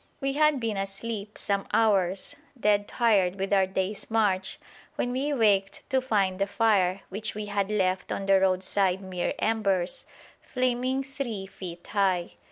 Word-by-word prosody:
We 275 -1 -1
had 300 -1 +3
been 225 -4 -2
asleep 200 +2 -4
some 200 -1 0
hours, 195 -4 +2 0.2
dead 205 -2 +2
tired 200 -7 +2
with 195 +1 -1
our 190 -1 +4
day's 190 +2 -3
march, 200 -4 0 0.4
when 245 - -1
we 270 +4 -1
waked 205 -7 +1
to 265 -1 +3
find 200 -7 0
the 195 - +1
fire, 200 -3 +2
which 210 +3 -4
we 215 0 -4
had 200 -1 -1
left 185 -3 0
on 195 - -2
the 195 0 +5
roadside 190 0 +1
mere 185 -2 -2
embers, 195 -5 0 0.3
flaming 255 +1 0
three 260 -7 -5
feet 175 -2 -9
high. 190 -4 0
200 Hz, 155 wpm, -27 LUFS, 190-225 Hz, 0.4 s, the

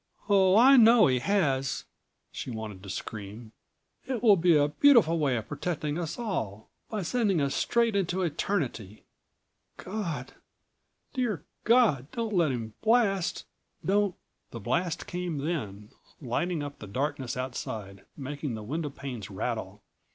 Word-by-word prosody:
"Oh, 195 -1 +5
I 265 +4 +8
know 230 -1 +7
he 130 -1 +2
has!" 135 -6 0 0.5
she - - -6
wanted 110 -5 -6
to 100 - -10
scream. 110 +3 -7 0.6
"It 255 -3 -3
will 215 -4 +7
be 170 -2 +4
a 145 0 +3
beautiful 190 - +5
way 135 -5 +1
of 110 -2 -5
protecting 155 -2 -3
us 165 -3 -4
all... 110 - -4 0.2
by 215 -3 -3
sending 205 -3 +1
us 140 -1 0
straight 235 -2 +1
into 185 -1 0
eternity. 140 - -2 0.7
God, 170 -10 -5 0.8
dear 220 - -2 0.2
God, 220 - +4
don't 230 -2 -2
let 170 -6 +3
him 115 -3 -4
blast. 215 -5 +2 0.4
Don't 200 +1 +2 0.2
" - - -50
The 115 - -7
blast 170 - -1
came 180 -3 -4
then, 110 - -4 0.3
lighting 155 +5 -2
up 145 0 -7
the 105 - -8
darkness 135 +3 -3
outside, 110 -6 -5
making 145 -2 -4
the 110 - -7
windowpanes 135 - -5
rattle. - - -4
155 Hz, 140 wpm, -28 LUFS, 125-200 Hz, 0.8 s, I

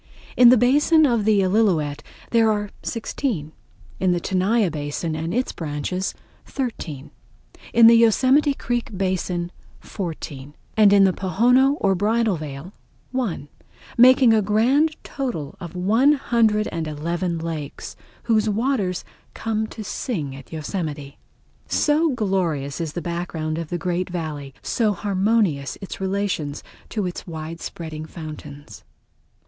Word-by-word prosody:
In 245 -1 +8
the 250 - +7
basin 295 +6 +4
of 235 -6 +1
the 210 -2 +4
Illilouette 180 -8 +1 0.3
there 230 -1 +4
are 210 -1 -2
sixteen, 220 - -3 0.5
in 185 -1 +2
the 175 - 0
Tenaya 190 +2 +1
basin 150 +2 -3
and 160 +2 -3
its 250 +3 0
branches 165 +4 -3 0.3
thirteen, 180 - -5 0.6
in 230 0 +6
the 230 - +9
Yosemite 260 +6 +4
Creek 240 -6 -3
basin 180 -2 -1 0.3
fourteen, 150 -6 -7 0.2
and 210 -2 +6
in 200 -1 +6
the 190 -1 +4
Pohono 250 - +3
or 195 -1 +2
Bridal 215 +2 +1
Veil 150 +3 -7 0.4
one, 230 - -2 0.5
making 255 -1 +7
a 220 - +4
grand 250 +10 +2
total 225 - -4
of 175 0 -8
one 225 +11 +4
hundred 225 -6 +2
and 165 -1 -3
eleven 170 +3 -2
lakes 160 -3 -6 0.3
whose 220 -2 +2
waters 210 -4 -1 0.3
come 220 -1 -2
to 220 - -8
sing 175 - -4
at 135 -1 -13
Yosemite. 155 -3 -5 0.5
So 310 +2 +2
glorious 180 - -1
is 160 -3 -4
the 175 - -4
background 165 -2 -3
of 165 -2 -5
the 175 - -2
great 180 +2 -2
Valley, 150 -6 -5
so 220 -3 +1
harmonious 195 -6 0
its 195 -1 -8
relations 190 -7 -2 0.3
to 210 -4 -2
its 180 +1 -6
widespreading 160 -1 -6
fountains. 145 - -10
190 Hz, 130 wpm, -22 LUFS, 160-230 Hz, 0.6 s, the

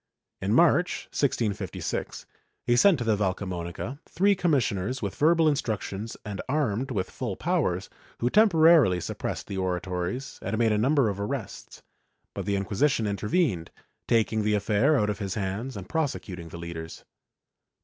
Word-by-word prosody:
In 95 - -1
March, 175 +2 +3
1656, 105 - -2 0.4
he 120 - +3
sent 190 +7 +5
to 120 - -3
the 110 -2 +2
Valcamonica 95 - -3
three 200 +3 +3
commissioners 130 - 0
with 100 - -2
verbal 160 +1 +3
instructions 110 -6 -2
and 105 -2 -4
armed 135 -3 0
with 100 -7 -2
full 120 -7 -4
powers, 150 - 0 0.3
who 120 - 0
temporarily 165 - +5
suppressed - - -4
the 95 - -4
oratories 90 +6 -3
and 100 +3 -2
made 115 -1 +3
a 105 - +2
number 135 +2 +3
of 100 -1 -2
arrests, 110 0 -5 0.5
but 100 -1 -5
the 100 - +1
Inquisition 110 +5 +1
intervened, 105 - 0 0.4
taking 110 -1 +2
the 105 0 +1
affair 105 +8 +2
out 105 0 +1
of 105 - -6
his 95 -2 -3
hands 105 +5 -3
and 95 -1 -8
prosecuting 95 - -3
the 85 - -8
leaders. 85 -1 -7
105 Hz, 150 wpm, -27 LUFS, 95-140 Hz, 0.5 s, sent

